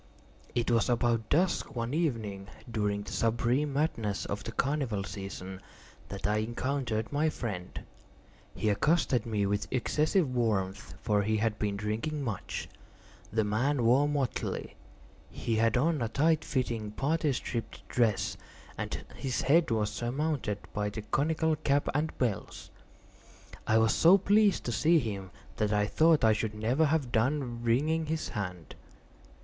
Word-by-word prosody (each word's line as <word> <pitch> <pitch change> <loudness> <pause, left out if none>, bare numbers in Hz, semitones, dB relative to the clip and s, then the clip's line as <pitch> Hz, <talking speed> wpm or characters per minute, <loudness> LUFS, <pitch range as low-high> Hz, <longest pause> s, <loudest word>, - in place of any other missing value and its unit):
It 120 0 +1
was 115 +2 +2
about 115 -2 +1
dusk, 170 -3 +1
one 115 +2 -2
evening 110 - -1 0.2
during 105 -2 -1
the - - -8
supreme 120 +5 +1
madness 115 -9 -1
of 100 +1 -4
the - - -5
carnival 135 -7 -1
season, 95 -1 -7 0.5
that 100 - -5
I 105 +1 +2
encountered 120 +1 -2
my 155 +2 +2
friend. 100 -11 -5 0.7
He 110 - 0
accosted 130 -1 +2
me 105 -3 0
with 100 -1 -1
excessive 150 - +1
warmth, 100 -6 -1
for 105 -3 +2
he 110 +2 +1
had 110 0 0
been 100 -2 -1
drinking 115 +9 -2
much. 110 -8 -4 0.6
The 110 +1 +2
man 120 +6 +1
wore 130 +5 +4
motley. 140 -4 -2 0.5
He 115 -1 -2
had 115 +2 +3
on 155 +2 +2
a 115 - 0
tight 155 +5 +2
fitting 120 -5 -2
parti 150 +7 0
striped 120 -3 -4
dress, 100 -5 +1 0.4
and - - -4
his 130 -3 -2
head 160 +6 +4
was 110 -2 0
surmounted 130 -3 -1 0.2
by 105 0 -1
the 105 +1 -6
conical 155 +6 +1
cap 145 -1 +1
and 150 +3 -1
bells. 120 -6 -3 1.0
I 110 - +4
was 110 0 +4
so 175 +4 +7
pleased 205 +1 +3
to 120 - -2
see 165 +8 +4
him, 100 -8 -3 0.3
that 105 -1 +1
I 105 -1 +2
thought 160 +7 +4
I 110 -1 +6
should 110 0 -2
never 120 +9 +2
have 145 -5 0
done 120 0 0
wringing 150 +7 +1
his 160 0 -2
hand. 90 -6 -5
115 Hz, 150 wpm, -30 LUFS, 105-145 Hz, 1.0 s, so